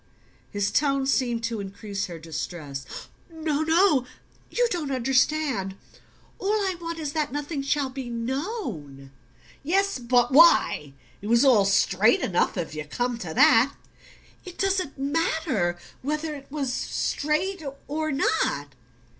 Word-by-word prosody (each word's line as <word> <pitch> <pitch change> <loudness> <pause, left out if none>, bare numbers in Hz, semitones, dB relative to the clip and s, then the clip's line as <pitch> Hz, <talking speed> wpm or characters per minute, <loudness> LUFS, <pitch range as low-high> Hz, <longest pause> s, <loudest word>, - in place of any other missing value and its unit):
His 205 -1 -1
tone 275 0 +1
seemed 240 -3 0
to 230 -1 -2
increase 200 0 -5
her 170 -2 -7
distress. 155 -3 -6 0.4
"No, 315 -2 -2
no 320 -5 +3 0.4
you 485 0 +2
don't 325 -5 -2
understand. 260 -5 +1 0.6
All 390 - -4
I 395 -3 0
want 335 0 -4
is 300 -3 -4
that 305 -4 -1
nothing 290 +1 -3
shall 275 -1 0
be 260 -2 -6
known." 235 - -4 0.5
"Yes; 390 +2 +1
but 245 0 +2
WHY? 265 - +5 0.3
It 205 - -6
was 235 +4 +4
all 225 -7 +5
straight 195 +3 +3
enough, 180 0 0
if 165 -4 -3
you 155 0 -4
come 245 +9 -2
to 175 -7 -5
that." 245 +5 +5 0.7
"It 365 -2 -10
doesn't 380 -7 -1
matter... 280 - 0 0.2
whether 305 +3 -2
it 280 -2 -10
was 275 -4 -2
straight... 320 +9 -1 0.3
or... 310 +1 -2
not 145 - 0
270 Hz, 135 wpm, -25 LUFS, 205-315 Hz, 0.7 s, WHY